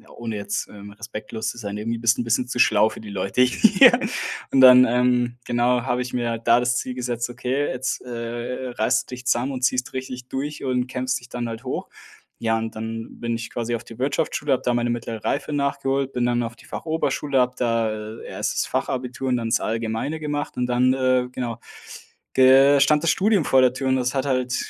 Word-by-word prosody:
ohne 115 Hz, -2 st, -5 dB
jetzt, 100 Hz, 0 st, -3 dB
ähm, 100 Hz, 0 st, -11 dB
respektlos 110 Hz, 0 st, -6 dB
zu 115 Hz, -, -7 dB
sein,- 105 Hz, -3 st, -5 dB
irgendwie 115 Hz, +2 st, -3 dB
bist 115 Hz, +1 st, +2 dB
du -, -, -1 dB
'n -, -, -2 dB
bisschen 115 Hz, +2 st, 0 dB
zu 125 Hz, -, -5 dB
schlau 110 Hz, -3 st, +5 dB
für 110 Hz, -, -10 dB
die 110 Hz, -, -9 dB
Leute 100 Hz, +4 st, -1 dB
hier.“ 205 Hz, -, +6 dB, 0.6 s
Und 135 Hz, -, +4 dB
dann, 125 Hz, 0 st, +9 dB
ähm, 125 Hz, 0 st, +1 dB
genau, 120 Hz, 0 st, +1 dB
habe 125 Hz, -1 st, -1 dB
ich 125 Hz, 0 st, -5 dB
mir 120 Hz, -1 st, -1 dB
halt 115 Hz, 0 st, -5 dB
da 115 Hz, +1 st, +6 dB
das 125 Hz, 0 st, +1 dB
Ziel 130 Hz, -, -3 dB
gesetzt, 120 Hz, -1 st, -3 dB
„Okay, 125 Hz, +4 st, -2 dB
jetzt 130 Hz, 0 st, -3 dB
äh 120 Hz, +1 st, -5 dB
reißt 115 Hz, 0 st, 0 dB
du -, -, -4 dB
dich 125 Hz, 0 st, -12 dB
zusammen 125 Hz, +2 st, +1 dB
und 130 Hz, -1 st, -5 dB
ziehst 130 Hz, 0 st, 0 dB
richtig 130 Hz, -1 st, -6 dB
durch 145 Hz, +3 st, -4 dB
und 125 Hz, -1 st, 0 dB
kämpfst 130 Hz, 0 st, -2 dB
dich 120 Hz, -, -15 dB
dann 120 Hz, -2 st, -4 dB
halt 115 Hz, +3 st, -8 dB
hoch.“ 130 Hz, -, -4 dB, 0.5 s
Ja, 115 Hz, -1 st, +1 dB
und 115 Hz, 0 st, -4 dB
dann 115 Hz, +1 st, -6 dB
bin 115 Hz, -1 st, -2 dB
ich 115 Hz, 0 st, -6 dB
quasi 120 Hz, 0 st, -3 dB
auf 115 Hz, -, -6 dB
die 115 Hz, 0 st, -13 dB
Wirtschaftsschule, 140 Hz, +1 st, 0 dB
habe 130 Hz, -, 0 dB
da 125 Hz, -, +1 dB
meine 120 Hz, 0 st, 0 dB
mittlere 115 Hz, -2 st, -4 dB
Reife -, -, -1 dB
nachgeholt, 140 Hz, -1 st, -1 dB
bin 125 Hz, -1 st, 0 dB
dann 120 Hz, 0 st, +1 dB
auf 115 Hz, 0 st, -5 dB
die -, -, -18 dB
Fachoberschule, 150 Hz, -3 st, -1 dB
habe 125 Hz, 0 st, 0 dB
da, 115 Hz, -2 st, +1 dB, 0.3 s
äh, -, -, -11 dB
erst -, -, -2 dB
das -, -, 0 dB
Fachabitur 130 Hz, +1 st, -3 dB
und 125 Hz, -, +2 dB
dann 115 Hz, -1 st, -3 dB
das -, -, +2 dB
Allgemeine 115 Hz, +7 st, -2 dB
gemacht 145 Hz, -1 st, -3 dB
und 125 Hz, 0 st, -1 dB
dann, 125 Hz, +1 st, +3 dB
äh, 130 Hz, -1 st, +1 dB
genau. 120 Hz, -3 st, -4 dB, 0.8 s
Der 135 Hz, +2 st, +7 dB
stand 150 Hz, +2 st, +4 dB
das 170 Hz, -, +4 dB
Studium 200 Hz, -2 st, +2 dB
vor 135 Hz, -, +4 dB
der 125 Hz, -1 st, +4 dB
Tür 135 Hz, +1 st, -3 dB
und 130 Hz, -, +3 dB
das 125 Hz, +1 st, -1 dB
hat 135 Hz, 0 st, 0 dB
halt 130 Hz, -2 st, 0 dB
125 Hz, 225 wpm, -23 LUFS, 115-130 Hz, 0.8 s, dann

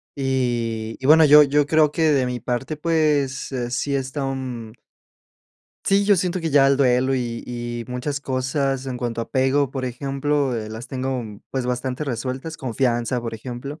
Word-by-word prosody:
Y 120 Hz, -5 st, -1 dB
y, 130 Hz, -, -7 dB
bueno, 155 Hz, +3 st, +7 dB
yo 150 Hz, 0 st, +9 dB
yo 145 Hz, +1 st, +2 dB
creo 155 Hz, 0 st, +3 dB
que 160 Hz, -1 st, +2 dB
de 135 Hz, -3 st, +2 dB
mi 125 Hz, 0 st, -3 dB
parte, 125 Hz, +6 st, -3 dB
pues, 150 Hz, -5 st, +1 dB
eh, 125 Hz, -2 st, -3 dB
sí 140 Hz, +3 st, -1 dB
está 135 Hz, +1 st, -3 dB
un. 125 Hz, -4 st, -4 dB, 1.1 s
Sí, 200 Hz, +1 st, +3 dB
yo 205 Hz, -1 st, +5 dB
siento 180 Hz, +1 st, -1 dB
que 165 Hz, -1 st, -2 dB
ya 140 Hz, -1 st, +5 dB
el 135 Hz, 0 st, +4 dB
duelo 130 Hz, 0 st, +3 dB
y 120 Hz, -2 st, -3 dB
y 120 Hz, -1 st, -5 dB
muchas 135 Hz, +3 st, -3 dB
cosas 135 Hz, 0 st, -1 dB
en 125 Hz, -1 st, -3 dB
cuanto 120 Hz, -1 st, -3 dB
a -, -, -2 dB
apego, 135 Hz, +1 st, +1 dB
por 130 Hz, -2 st, -4 dB
ejemplo, 135 Hz, +1 st, -1 dB
eh, 110 Hz, -1 st, -4 dB
las 110 Hz, +3 st, -8 dB
tengo, 130 Hz, -1 st, -2 dB
mm, 105 Hz, -2 st, -10 dB
pues, 130 Hz, -2 st, -2 dB
bastante 125 Hz, +2 st, -2 dB
resueltas, 130 Hz, +5 st, -4 dB
confianza, 120 Hz, -1 st, -1 dB
por 115 Hz, -1 st, -5 dB
ejemplo, 125 Hz, +6 st, -7 dB
130 Hz, 185 wpm, -22 LUFS, 120-145 Hz, 1.1 s, yo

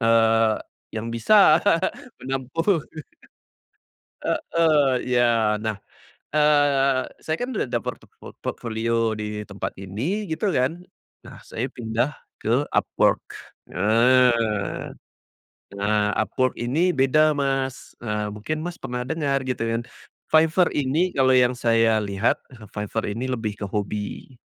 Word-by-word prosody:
eee, 115 Hz, -1 st, +4 dB, 0.4 s
yang 110 Hz, +1 st, -4 dB
bisa 155 Hz, -, +5 dB, 0.6 s
menampung. 135 Hz, +8 st, 0 dB, 1.4 s
Heeh, 155 Hz, -5 st, +2 dB, 0.2 s
ya 115 Hz, -3 st, +3 dB
nah, 110 Hz, -2 st, -2 dB, 0.6 s
eee, 145 Hz, -3 st, +3 dB, 0.2 s
saya 155 Hz, -, -1 dB
kan 245 Hz, +1 st, -3 dB
udah -, -, +1 dB
ada 120 Hz, -, -1 dB
porto -, -, -6 dB, 0.4 s
portfolio 115 Hz, 0 st, -1 dB
di 105 Hz, 0 st, -4 dB
tempat 100 Hz, -, -4 dB
ini 130 Hz, -, -3 dB
gitu 160 Hz, +5 st, -1 dB
kan, 150 Hz, +5 st, 0 dB, 0.4 s
nah -, -, -12 dB
saya 125 Hz, +4 st, -3 dB
pindah 120 Hz, +3 st, -1 dB, 0.3 s
ke -, -, +1 dB
Upwork, -, -, +2 dB, 0.5 s
eee. 115 Hz, +1 st, +2 dB, 0.8 s
Nah, 105 Hz, +1 st, +1 dB
Upwork 130 Hz, +3 st, 0 dB
ini 160 Hz, +10 st, +1 dB
beda 150 Hz, +3 st, +4 dB
Mas, 135 Hz, -2 st, -2 dB
eee, 105 Hz, -2 st, -2 dB
mungkin 155 Hz, +10 st, -4 dB
Mas 175 Hz, 0 st, -5 dB
pernah 125 Hz, 0 st, -4 dB
dengar 140 Hz, -3 st, -1 dB
gitu 130 Hz, -3 st, -3 dB
kan, 115 Hz, +1 st, -1 dB, 0.5 s
Fiverr 160 Hz, +3 st, +4 dB
ini 150 Hz, +6 st, +1 dB
kalau 130 Hz, -1 st, +4 dB
yang 125 Hz, 0 st, +4 dB
saya 115 Hz, -2 st, +3 dB
lihat, 100 Hz, +2 st, 0 dB, 0.2 s
ah 110 Hz, -3 st, -13 dB
Fiverr 105 Hz, +1 st, -3 dB
ini 115 Hz, +5 st, -3 dB
lebih 110 Hz, -4 st, -3 dB
ke 105 Hz, -, -4 dB
hobi 105 Hz, +5 st, -5 dB
125 Hz, 120 wpm, -23 LUFS, 110-145 Hz, 1.4 s, bisa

